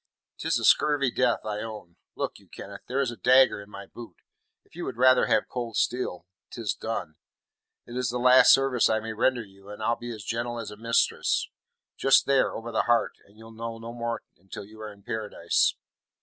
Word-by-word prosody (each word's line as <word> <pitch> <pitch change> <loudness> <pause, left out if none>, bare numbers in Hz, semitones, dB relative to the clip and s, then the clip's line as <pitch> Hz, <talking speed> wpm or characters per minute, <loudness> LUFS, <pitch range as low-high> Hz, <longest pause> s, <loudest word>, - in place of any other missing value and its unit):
"Tis - - 0
a - - -4
scurvy 145 -4 +4
death, 125 -1 +1
I 105 -1 -3
own. 105 -6 -8 0.2
Look - - -4
you, - - -23
Kenneth, 100 0 -10
there 135 +2 0
is 130 -3 -1
a - - -8
dagger 130 -2 +4
in 100 - -14
my 100 -1 -9
boot. 115 +3 -12 0.5
If - - -23
you - - -5
would - - -5
rather 130 0 +5
have - - +2
cold 120 -3 -5
steel, 105 -9 -1 0.2
'tis 115 -4 -3
done. 85 -8 -5 0.7
It 120 - -10
is 125 0 -1
the 125 - -2
last 125 +1 +7
service 135 -3 +4
I 110 - +2
may 110 0 -6
render 120 +2 +1
you, 100 -1 -17
and 105 +1 -8
I'll 115 +2 +2
be 120 +1 -7
as 110 -3 -8
gentle 120 +1 -3
as 115 -2 -6
a - - -9
mistress. 115 +2 +1 0.5
Just 135 - +4
there, 140 -1 +2
over 115 +1 -6
the 110 - 0
heart, 120 -1 +3
and 100 +2 -23
you'll 115 0 -13
know 115 0 -6
no 115 +1 -8
more 120 -1 -4 0.2
until 95 +2 -9
you 110 +2 -14
are 110 0 -6
in 100 -1 -18
Paradise." 105 -6 0
115 Hz, 210 wpm, -26 LUFS, 105-125 Hz, 0.7 s, last